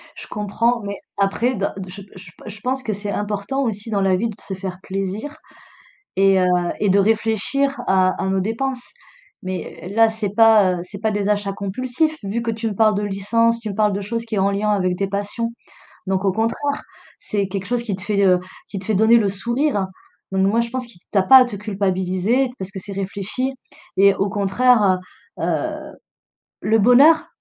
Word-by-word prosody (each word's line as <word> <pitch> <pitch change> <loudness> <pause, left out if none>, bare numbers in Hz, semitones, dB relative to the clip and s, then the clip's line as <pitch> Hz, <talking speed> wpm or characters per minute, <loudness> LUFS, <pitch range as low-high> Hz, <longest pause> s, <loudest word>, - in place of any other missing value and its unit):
Je - - -10
comprends, 230 +4 0
mais 200 -1 -5 0.2
après, 205 +6 +1
d 200 -1 0 0.2
je 195 +2 -9
je 185 -1 -11
p - - -16
je 205 0 -9
pense 260 +2 -2
que 220 - -2
c'est 205 +1 -4
important 210 +7 -2
aussi, 220 -2 -3
dans 205 -3 0
la 190 -1 +3
vie, 225 +5 -1
de 215 - -7
se 195 - -6
faire 185 -1 -5
plaisir 195 +11 -4 0.8
et 195 0 +4
heu, 185 - +3 0.3
et 205 - +2
de 195 +2 +4
réfléchir 225 +6 +1
à 185 -1 +4
à 190 - -1
nos 190 0 +1
dépenses. 245 +6 -2 0.6
Mais 185 -1 -6
là, 225 0 +6
c'est 220 -3 -4
pas, 220 -4 +6
heu, 180 - -3
c'est 195 +2 -10
pas 220 0 +1
des 205 -1 -1
achats 205 -1 0
compulsifs, 255 +11 -1
vu 205 +4 -2
que 230 0 -1
tu 225 +1 -3
me 210 - -3
parles 215 0 +4
de 205 - -1
licence, 230 +4 +1
tu 225 -2 -6
me 200 - -5
parles 210 -1 +2
de 200 - -2
choses 230 +3 -4
qui 225 -1 -4
est - - -1
en 195 +1 +2
lien 210 +2 0
avec 185 -3 0
tes 195 - -1
passions. 205 +4 -3 0.6
Donc 190 +1 0
au 195 - +3
contraire, 230 +7 -1 0.4
c'est 200 -2 -2
quelque 195 0 -4
chose 240 +1 -1
qui 210 -5 -2
te 190 - -12
fait, 205 -1 +1
heu, 180 -1 +5 0.3
qui 195 - -5
te 185 - -10
fait 220 - 0
donner 220 +4 +6
le 215 -3 +2
sourire. 235 +2 -1 0.4
Donc 190 0 +2
moi, 225 +4 +2
je 235 - -3
pense 255 +1 -4
qui 230 -7 -17
que - - -31
tu - - 0
as - - +2
pas 265 +8 +9
à 255 - +7
te 240 -4 -6
culpabiliser 195 +4 0
parce 190 0 -6
que 195 - -6
c'est 200 +2 -8
réfléchi 200 +6 -3 0.5
et 200 +1 +6
au 200 - 0
contraire, 200 0 +3 0.4
heu - - -3
heu, - - -2 0.7
le 220 +1 +3
bonheur, 275 +9 +6
205 Hz, 215 wpm, -21 LUFS, 195-230 Hz, 0.8 s, pas